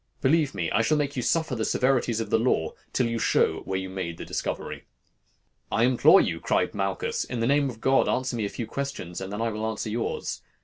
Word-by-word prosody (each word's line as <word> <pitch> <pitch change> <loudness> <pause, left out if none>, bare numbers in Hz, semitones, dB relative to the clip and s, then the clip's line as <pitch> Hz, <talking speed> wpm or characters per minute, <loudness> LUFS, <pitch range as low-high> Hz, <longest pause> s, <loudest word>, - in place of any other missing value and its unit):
Believe 145 -2 +2
me, 85 -4 -2
I 105 - +3
shall 155 +6 +2
make 145 -1 -1
you 125 - -1
suffer 160 +2 0
the 110 - -2
severities 125 -2 +1
of 110 -2 -4
the 115 - +4
law 95 -9 +1 0.2
till 125 - +1
you 115 0 -1
show - - +2
where 95 - -1
you 95 0 -4
made 90 -3 -5
the - - -7
discovery.' - - -4 0.9
"'I 115 - +2
implore 125 0 +6
you,' - - -1
cried - - 0
Malchus, 95 -1 -1
'in 125 - -5
the 115 - +1
name 140 +2 +3
of 115 -2 -9
God, 135 +2 +3
answer 130 -1 0
me 115 - -1
a - - -2
few 120 - -5
questions, 135 -11 -5
and 95 0 -5
then 105 +3 -2
I 115 - +1
will 110 +1 -3
answer 110 0 -4
yours. 115 +1 -3
115 Hz, 230 wpm, -26 LUFS, 100-130 Hz, 0.9 s, implore